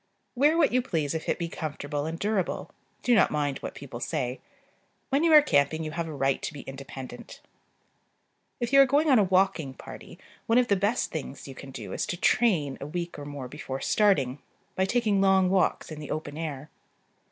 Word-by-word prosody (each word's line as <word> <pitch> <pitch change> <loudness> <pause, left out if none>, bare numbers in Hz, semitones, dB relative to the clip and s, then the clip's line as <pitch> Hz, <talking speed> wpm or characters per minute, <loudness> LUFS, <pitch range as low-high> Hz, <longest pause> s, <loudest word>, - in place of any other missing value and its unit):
Wear 295 +5 +3
what 320 -4 +4
you 250 +1 +3
please 160 - -2
if 160 - -4
it - - +1
be 170 - -3
comfortable 145 -2 -4
and 165 +1 -4
durable: 200 -1 -2 0.3
do 245 - +3
not 220 - +5
mind 145 -2 -1
what - - -7
people 130 -4 -8
say. 125 +1 -2 0.7
When 280 +3 +2
you 335 - +4
are 300 -1 +9
camping 145 - +2
you 155 - -4
have 165 +1 -3
a - - -6
right 135 -2 0
to - - -4
be 145 - -8
independent. 135 -1 -9 1.2
If 240 +1 -3
you 275 - +9
are 275 - +6
going 290 +3 +3
on 255 - +6
a - - +5
walking 185 -7 +1
party, - - -11 0.3
one 230 - +4
of 250 -1 +3
the 200 - +4
best 205 +5 0
things 145 -3 -6
you 135 - -8
can 135 +1 -10
do 135 - -7
is - - -2
to 175 - -3
"train" 170 - +2
a 140 - -5
week 170 0 -5
or 145 - -7
more 145 -3 -6
before 135 0 -6
starting, 150 -12 +2 0.4
by 190 - +2
taking 210 -2 +1
long 190 -1 +4
walks 190 -3 +1
in 155 - -7
the 150 - -8
open 145 -2 -4
air. 150 -2 -5
165 Hz, 210 wpm, -27 LUFS, 145-210 Hz, 1.2 s, are